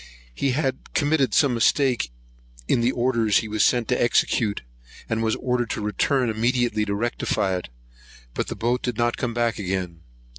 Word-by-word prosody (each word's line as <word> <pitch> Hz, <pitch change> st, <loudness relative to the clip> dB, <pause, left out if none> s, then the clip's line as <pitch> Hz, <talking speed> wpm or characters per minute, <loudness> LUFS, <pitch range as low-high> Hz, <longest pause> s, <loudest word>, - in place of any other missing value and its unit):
He 135 Hz, -, 0 dB
had 135 Hz, -2 st, -3 dB
committed 145 Hz, -2 st, +2 dB
some 140 Hz, -4 st, +4 dB
mistake 120 Hz, -, +2 dB, 0.6 s
in 120 Hz, -, +2 dB
the 120 Hz, +2 st, +2 dB
orders 120 Hz, -4 st, +2 dB
he 110 Hz, -, -1 dB
was 105 Hz, 0 st, +1 dB
sent 120 Hz, -3 st, +2 dB
to 125 Hz, -, +1 dB
execute, 115 Hz, -2 st, +1 dB, 0.4 s
and 115 Hz, 0 st, -1 dB
was 110 Hz, -1 st, +1 dB
ordered 125 Hz, -2 st, -1 dB
to -, -, -3 dB
return 120 Hz, +5 st, +1 dB
immediately 115 Hz, 0 st, +1 dB
to 100 Hz, -1 st, -2 dB
rectify 100 Hz, -3 st, -1 dB
it; 90 Hz, -, -5 dB, 0.6 s
but -, -, -2 dB
the -, -, -4 dB
boat 120 Hz, +2 st, 0 dB
did 125 Hz, -3 st, -3 dB
not 120 Hz, 0 st, +1 dB
come 120 Hz, -3 st, -3 dB
back 120 Hz, -2 st, 0 dB
again. 90 Hz, -3 st, -3 dB
120 Hz, 175 wpm, -24 LUFS, 105-125 Hz, 0.6 s, some